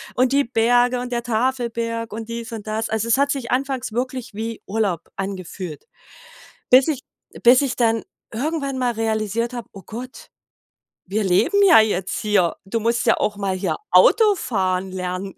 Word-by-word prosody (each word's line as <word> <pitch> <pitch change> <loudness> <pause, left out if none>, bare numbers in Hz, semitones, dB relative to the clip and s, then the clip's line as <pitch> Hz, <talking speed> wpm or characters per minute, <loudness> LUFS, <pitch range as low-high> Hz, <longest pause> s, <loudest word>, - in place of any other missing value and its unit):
Und 255 +1 +2
die 280 0 +3
Berge 245 +1 +2
und 250 0 -5
der 235 -1 -2
Tafelberg 230 -1 -2
und 220 +1 -6
dies 230 +1 -6
und 220 -3 -7
das. 220 +1 -2
Also 220 +1 -1
es 230 - +3
hat 280 0 +2
sich 265 -4 -4
anfangs 260 -3 -1
wirklich 255 -1 -3
wie 225 +2 -5
Urlaub 200 -5 -1
angefühlt, 185 -4 -6 0.9
bis 260 +3 +7
ich 280 -4 -1 0.4
bis 250 +2 +7
ich 270 -3 -1
dann 225 -2 +1 0.3
irgendwann 275 +2 -2
mal 245 -1 +1
realisiert 225 +1 -1
habe: 240 -4 -6
„Oh 195 - -11
Gott, 250 +4 -9 0.8
wir 205 +3 -1
leben 190 - +3
ja 335 - +8
jetzt 195 -4 -1
hier. 200 -5 +1
Du 230 +4 -1
musst 235 +2 0
ja 230 - +4
auch 210 - -1
mal 195 -2 -2
hier 185 +1 -1 0.2
Autofahren 200 - +3
lernen.“ 185 +1 -4
230 Hz, 170 wpm, -21 LUFS, 205-250 Hz, 0.9 s, ja